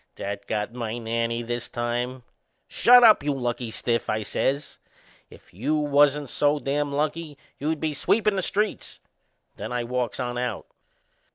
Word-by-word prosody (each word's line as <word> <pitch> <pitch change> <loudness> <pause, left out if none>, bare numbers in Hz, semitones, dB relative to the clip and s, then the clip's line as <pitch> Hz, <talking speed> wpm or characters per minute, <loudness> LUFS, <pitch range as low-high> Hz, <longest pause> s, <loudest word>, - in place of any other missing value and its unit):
That 100 0 -5
got 105 +1 -2
my 120 -2 -4
nanny 115 0 -2
this 120 0 -4
time. 120 +2 -3 0.4
"Shut 245 +1 +6
up, 220 -2 +7
you 145 -1 0
lucky 120 -2 -3
stiff!" 115 +1 -1
I 110 0 0
says. 140 +7 -2 0.5
"If - - -18
you 130 - -1
wasn't 145 -2 +3
so 145 0 +2
dam' 145 0 -1
lucky 150 +1 -2 0.2
you'd 155 +2 -1
be 155 -1 -1
sweepin' 210 +8 +2
the 190 - 0
streets." 210 +3 -2 0.6
Then - - -6
I 120 -1 -1
walks 125 -1 -2
on 120 0 -2
out. 125 -4 -3
125 Hz, 155 wpm, -25 LUFS, 120-150 Hz, 0.6 s, up